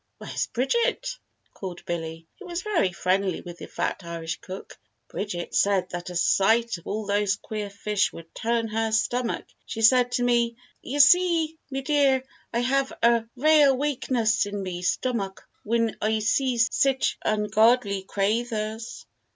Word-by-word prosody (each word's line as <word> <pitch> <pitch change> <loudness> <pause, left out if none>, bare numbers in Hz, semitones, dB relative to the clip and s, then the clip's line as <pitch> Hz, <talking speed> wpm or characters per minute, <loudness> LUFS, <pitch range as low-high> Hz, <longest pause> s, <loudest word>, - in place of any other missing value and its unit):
"Where's - - -3
Bridget?" 365 - 0 0.4
called 185 -3 -8
Billy, 165 -1 -4
who 395 - -10
was 345 +1 -4
very 365 - +1
friendly 185 +1 0
with 175 -1 -10
the - - -8
fat - - -3
Irish 165 -1 -5
cook. 190 +1 -9 0.3
"Bridget 180 -4 -4
said 195 -2 +2
that 175 0 -5
a 180 - -7
sight 220 +4 +2
of - - -16
all 215 +1 -3
those 205 0 +1
queer 210 0 -5
fish 205 0 0
would 165 0 -12
turn 230 0 -1
her 225 +1 -1
stomach 235 +2 0 0.2
she 225 - -4
said 245 +2 +5
to 245 - +1
me, 235 -1 +2 0.3
'Ye 275 - -4
see, 330 +1 +5
me 270 -1 -3
dear, 275 -2 +3 0.3
I 235 - 0
hev 270 +2 +1
a 235 -1 +4
rale 290 0 +5
wakeness 245 -6 +1
in 205 -1 -4
me 180 -2 -5
stomack 195 0 -2 0.2
whin 230 0 0
I 220 +1 +1
see 245 +4 +1
sich 260 +3 +2
ungodly 215 -1 +2
craythers. 220 +2 -2
225 Hz, 150 wpm, -25 LUFS, 195-255 Hz, 0.4 s, said